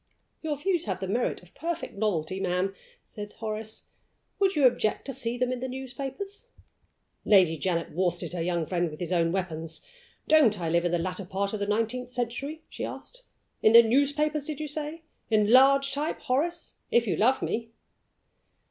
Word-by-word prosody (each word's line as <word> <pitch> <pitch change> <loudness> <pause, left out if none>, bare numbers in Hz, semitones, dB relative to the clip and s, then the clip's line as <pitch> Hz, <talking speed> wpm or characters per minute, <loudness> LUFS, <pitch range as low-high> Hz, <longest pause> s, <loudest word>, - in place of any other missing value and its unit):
"Your 310 -2 -1
views 345 +2 0
have - - -2
the 190 - -3
merit 225 -1 -1
of 175 - -19
perfect 335 +1 -4
novelty, 190 -4 -1
ma'am," 185 +1 0 0.3
said 210 -1 -8
Horace. 220 -1 -5 0.6
"Would 390 -2 +3
you 290 -3 +4
object 225 -3 +2
to 270 - -4
see 240 -2 +1
them 250 0 0
in 255 - -2
the 260 - -3
newspapers?" 270 - -6 0.8
Lady 185 -6 +5
Janet 170 +1 -1
worsted 175 0 -1
her 175 - -2
young 170 -1 0
friend 175 0 0
with 155 - -10
his 175 +1 -2
own 165 -1 +2
weapons. 165 -3 -3 0.4
"Don't 265 -10 +5
I 165 -2 -2
live 170 +1 +2
in 175 - +1
the 175 - +2
latter 185 +3 -3
part 195 +2 -2
of 215 - -2
the 200 - -2
nineteenth 230 +4 0
century?" 250 +5 -3
she - - -7
asked. - - -7 0.4
"In 215 - +5
the 235 0 +10
newspapers, 285 +5 +2
did 305 -1 -5
you 305 - -3
say? 305 +2 -4 0.3
In 215 -1 +3
large 275 +1 +6
type, 295 +3 -1
Horace, 335 +7 -1
if 235 0 +3
you 205 - 0
love 255 +5 +3
me!" 230 0 -2
230 Hz, 185 wpm, -27 LUFS, 185-275 Hz, 0.8 s, the